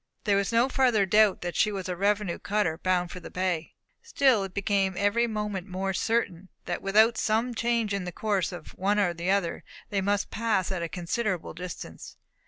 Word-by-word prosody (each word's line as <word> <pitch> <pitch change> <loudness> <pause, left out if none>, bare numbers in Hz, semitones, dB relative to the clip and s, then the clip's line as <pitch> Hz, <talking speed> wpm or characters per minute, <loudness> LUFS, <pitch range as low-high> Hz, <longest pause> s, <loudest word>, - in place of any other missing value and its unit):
There 205 -4 +2
was 200 +2 +1
no 230 +2 +4
further 250 -7 +3
doubt 210 0 +4
that 175 -1 -4
she 215 - +3
was 195 -2 -4
a 180 - -2
revenue 200 -1 0
cutter 195 -6 0
bound 180 -1 0
for 180 - -7
the 175 - -10
bay. 180 -3 -2 0.3
Still 260 -7 +3
it 190 -1 -6
became 200 -2 +1
every 225 +4 +2
moment 210 -4 -3
more 190 +1 -2
certain 190 -4 -1 0.2
that - - -3
without 220 +4 +4
some 225 +3 +1
change 230 -2 0
in 200 -2 -2
the 180 - -4
course 200 0 -1
of 175 -3 -10
one 200 +3 +1
or 185 -4 +2
the 170 +2 -3
other, 195 -4 0 0.3
they 200 -1 +1
must 200 +1 0
pass 215 -5 0
at 185 -2 -2
a 170 - -3
considerable 185 +2 -2
distance. 180 +2 -8
200 Hz, 195 wpm, -27 LUFS, 180-215 Hz, 0.3 s, no